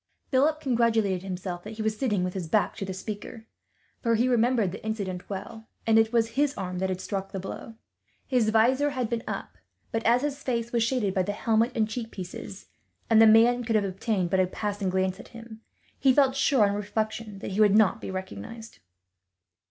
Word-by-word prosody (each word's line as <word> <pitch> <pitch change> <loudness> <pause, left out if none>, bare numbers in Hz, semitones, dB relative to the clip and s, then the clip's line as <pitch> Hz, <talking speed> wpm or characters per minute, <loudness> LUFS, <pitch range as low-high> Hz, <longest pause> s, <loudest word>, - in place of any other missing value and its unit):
Philip 300 +4 +3
congratulated 225 - +1
himself 180 -2 -5
that 215 - -8
he 220 - -4
was 220 0 0
sitting 210 -6 0
with 180 0 -2
his 185 -4 -4
back 205 +4 +1
to 195 - -3
the 190 - -5
speaker, 210 +4 -7 0.6
for 230 -1 +2
he 240 +3 +2
remembered 240 -5 +2
the 195 - -9
incident 200 -5 -4
well, 220 +3 -7 0.2
and 225 0 +5
it 225 0 +2
was 230 -1 +2
his 280 +4 0
arm 180 -2 -4
that 190 0 0
had 185 -1 -2
struck 195 0 -4
the 195 - -4
blow. 195 +4 -7 0.5
His 245 -5 +2
visor 255 +6 +3
had 255 -4 -3
been 235 -1 -1
up; - - -6 0.3
but 225 0 -1
as 240 +3 +3
his 290 -1 -3
face 235 -3 -2
was 235 - +1
shaded 230 -4 +1
by 190 - +2
the 200 +3 -2
helmet 225 +3 +1
and 220 -2 +2
cheek 225 +1 -5
pieces, 190 +1 -8 0.5
and 225 0 +7
the 225 - +8
man 235 +3 +5
could 225 -1 -1
have 210 -2 +3
obtained 190 -1 -1
but 190 - +2
a 185 - +3
passing 205 0 -3
glance 190 0 0
at - - -11
him, 225 -1 -11 0.4
he 270 - +5
felt 265 0 +3
sure, 265 -5 +3
on 200 - -1
reflection, 210 +1 -3
that 195 - -6
he 200 +3 +1
would 205 -1 +5
not 215 -5 +4
be - - -6
recognized. 205 - -7
220 Hz, 210 wpm, -27 LUFS, 195-235 Hz, 0.6 s, the